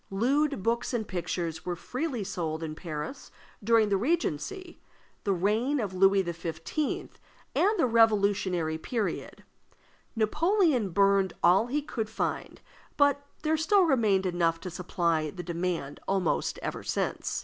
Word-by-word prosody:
Lewd 270 +4 +1
books 235 +3 0
and 220 -3 -2
pictures 170 -3 -3
were 180 -1 -3
freely 255 - -3
sold 165 -4 -3
in 155 -1 -4
Paris 155 - -6 0.3
during 225 -1 +4
the 200 - +2
Regency, 340 - -2 0.5
the 200 - +2
reign 215 +10 +1
of 205 -5 -3
Louis 195 +1 +4
XV., 170 -2 -5 1.0
and 420 +4 +3
the - - +3
Revolutionary 200 -8 +2
period. 225 +3 -3 0.7
Napoleon 300 - +2
burned 195 0 +3
all 185 +6 +5
he 290 +4 -1
could 225 -7 -4
find, 220 - -3 0.4
but 285 0 +3 0.2
there 315 0 +2
still 370 +5 +4
remained 220 - +2
enough 170 -2 +1
to 185 - -6
supply 170 -3 0
the 180 +4 -7
demand 170 -4 -3
almost 190 -3 0
ever - - -3
since. - - -2
200 Hz, 135 wpm, -28 LUFS, 175-255 Hz, 1.0 s, all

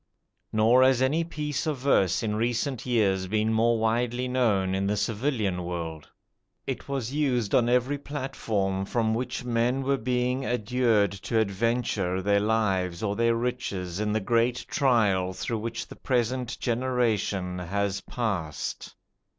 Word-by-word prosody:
Nor 115 +4 +4
has 130 -1 +5
any 140 +6 +2
piece 150 -1 -3
of 150 -3 0
verse 120 -9 +2
in 105 -1 -1
recent 120 +3 -1
years 100 -6 +2
been 110 +2 +1
more 115 +1 +3
widely 120 +3 0
known 110 -7 +1
in 95 +1 0
the 105 +1 0
civilian 105 -3 -1
world. 85 -3 -5 0.6
It - - -5
was 135 -3 -3
used 125 -8 0
on 120 -1 +4
every 125 +3 +1
platform 110 -9 -2
from 110 +1 0
which 125 +1 -3
men 120 +2 +1
were 135 0 +1
being 125 +2 0
adjured 120 -3 +1
to 100 +3 -3
adventure 105 -3 0
their 100 +2 +2
lives 100 -5 0
or 100 -1 0
their 115 +1 +2
riches 105 -7 -3
in 105 0 0
the 110 - +1
great 115 +3 +1
trial 105 - +2
through 110 +4 -3
which 115 +1 -4
the - - -11
present 125 0 -1
generation 115 -7 0
has 100 +2 -2
passed. 95 -10 -4
115 Hz, 145 wpm, -27 LUFS, 100-125 Hz, 0.6 s, has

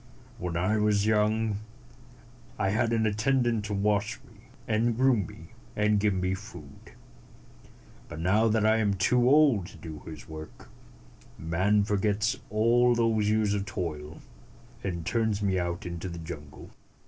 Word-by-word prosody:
When 85 -1 -3
I 95 +5 +1
was 105 -1 +2
young, 110 0 +1 1.0
I 100 - +1
137 - - 0
had 115 +1 +1
an 110 -1 +2
attendant 115 +1 +1
to 105 -1 -3
wash 105 +1 0
me, - - -20 0.2
and 115 +1 +1
groom 125 -8 +3
me, - - -13 0.3
and 105 0 +2
give 100 -1 +1
me 90 0 -1
my - - 0
food. 90 -8 -11 1.2
But 75 - -7
now 100 +7 +3
that 110 -1 +2
I 110 +1 +4
am 105 -3 +1
too 120 +6 +3
old 140 - +4
to - - -13
do 80 -2 -8
his 80 -3 -9
work, 80 0 -10 0.7
man 95 +6 +1
forgets 105 +1 0
all 120 +3 +3
those 110 -3 +2
years 105 -1 +2
of 100 -1 -2
toil, 80 -6 -5 0.6
and 85 -4 -3
turns 110 -2 0
me 95 -2 +1
out 85 0 -3
into 85 +1 -5
the 85 - -7
jungle." 80 -3 -9
105 Hz, 160 wpm, -28 LUFS, 90-110 Hz, 1.2 s, I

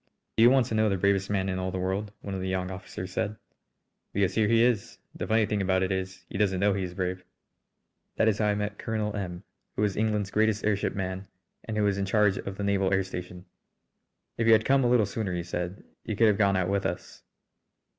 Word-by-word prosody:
"Do - - +2
you 120 - +9
want 130 -1 +4
to 115 - -5
know 110 0 +3
the 95 - 0
bravest 100 +1 +1
man 95 -2 0
in 95 -1 -2
all 95 0 -2
the 95 - -4
world?" 95 +3 -2
one 100 - -6
of 95 - -3
the 95 - -3
young 95 0 -2
officers 95 0 -7
said. 105 +3 -2 0.8
"Because 100 -2 +1
here 110 -2 +2
he 115 +1 +4
is. 120 -4 0 0.2
The - - -5
funny 110 0 +3
thing 105 -1 -1
about 95 0 +2
it 95 - -1
is 95 0 -4
he 95 - -6
doesn't 95 -3 +2
know 100 +1 +3
he 100 - -2
is 90 -1 -5
brave." 90 0 -2 0.9
That 110 - +2
is 105 -2 +2
how 105 - +2
I 105 - +2
met 105 0 -3
Colonel 110 -2 -2
M, 90 -3 -5 0.3
who 105 - 0
is 100 -3 0
England's 105 -2 0
greatest 110 0 +1
airship 105 -2 0
man 95 0 -4 0.4
and 110 -1 -4
who 105 - +2
is 100 -1 +1
in 100 - 0
charge 105 0 +3
of 95 0 -6
the 100 - -3
naval 100 -1 +1
air 95 0 +3
station. 90 -1 -7 0.9
"If 115 - +1
you 115 - +8
had 110 0 +4
come 135 0 +4
a 120 - +3
little 120 -3 +4
sooner," 100 -2 -3
he 85 - -2
said, 90 +2 -4 0.2
"you 110 - -3
could 115 - +4
have 105 - +2
gone 100 -2 +3
out 90 -1 +1
with 100 0 +1
us." - - -7
100 Hz, 245 wpm, -28 LUFS, 95-105 Hz, 0.9 s, you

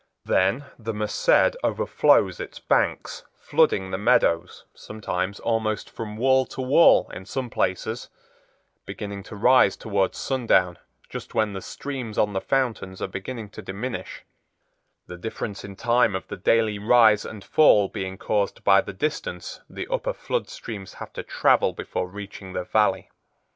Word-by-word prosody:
Then 100 +10 +2
the 115 -1 -4
Merced 105 - +2
overflows - - +2
its - - -7
banks, - - 0
flooding 465 - +1
the 95 - -2
meadows, 100 -7 +2
sometimes 100 -2 -4
almost 110 -2 -1
from 110 -2 -7
wall 130 +2 +3
to - - -10
wall 140 +6 +5
in 95 +2 -8
some 130 +1 -4
places, 110 +6 -2 0.7
beginning 100 -1 -6
to 105 - -10
rise 120 -1 +4
towards 100 -3 -1
sundown 95 -9 +1 0.3
just - - -8
when 110 -2 +1
the 95 - -5
streams 130 -5 -6
on 105 -1 +2
the 95 - -1
fountains 120 -8 -1
are - - -2
beginning 105 +4 -6
to 110 - -10
diminish, 105 +6 -6 0.8
the 90 - -9
difference 105 0 -5
in 100 -1 -9
time 120 -1 +2
of 95 - -5
the - - -4
daily 105 +2 +2
rise 110 -1 +5
and 105 -3 -8
fall 105 -10 +5
being 95 -1 -5
caused 100 +1 -1
by 100 -1 +6
the - - -8
distance 150 +10 -4
the - - -6
upper - - -1
flood - - -3
streams 100 -5 -8
have - - -9
to - - -5
travel - - +2
before 90 - -4
reaching 100 -1 -9
the 90 - -2
Valley. 95 -1 +1
105 Hz, 155 wpm, -24 LUFS, 95-120 Hz, 0.8 s, by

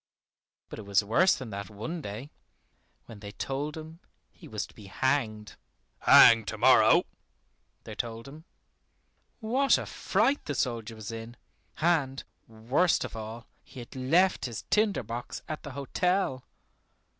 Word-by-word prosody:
But - - -8
it 105 - -9
was 100 +1 +3
worse 170 - +3
than 125 -4 -8
that 100 +1 -6
one 110 +12 -6
day, 115 +4 -7 0.7
when 110 - -12
they 100 0 -9
told 145 +5 -4
him 160 +1 -10 0.3
he - - -15
was - - -4
to - - -19
be 100 - -13
hanged, 110 -2 -1 0.4
"hanged 115 -2 +7
to - - -4
morrow," - - +6 0.8
they - - -9
told 115 0 -5
him. 150 +3 -12 1.0
What 260 +5 +3
a - - -5
fright 235 +9 0
the 145 - -3
soldier 115 -3 -2
was 110 0 -7
in, 115 +1 -8 0.4
and, 150 -5 +1 0.2
worst 120 +11 +1
of - - -8
all, 110 +1 -7 0.2
he - - -13
had 120 - -11
left 165 +9 +2
his 120 -3 -6
tinder 210 - +2
box 115 +3 -6
at 155 - -5
the 145 -4 -9
hotel. 140 0 -1
130 Hz, 150 wpm, -28 LUFS, 110-160 Hz, 1.0 s, hanged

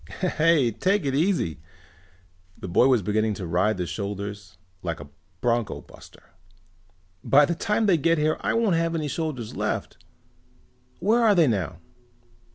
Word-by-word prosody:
"Hey, 160 -8 +1
take 190 - 0
it 135 - 0
easy!" 150 - 0 1.0
The - - -7
boy 90 +8 +4
was 125 -6 +3
beginning 110 +2 0
to 95 - -6
ride 90 +5 +1
the 90 - -2
shoulders 100 0 -6 0.2
like 85 -2 -4
a 75 -1 -11 0.3
bronco 120 -2 0
buster. - - -17 0.9
"By 145 +2 +5
the 170 - -1
time 210 +6 0
they 190 -5 +4
get 165 +3 +2
here 155 +1 +1
I - - 0
won't 225 -6 +2
have 165 0 0
any 155 -2 -2
shoulders 145 -7 -4
left. - - -3 0.9
Where 220 +7 +2
are 220 -3 +5
they 170 -3 +5
now?" 95 - -1
135 Hz, 155 wpm, -25 LUFS, 100-165 Hz, 1.0 s, By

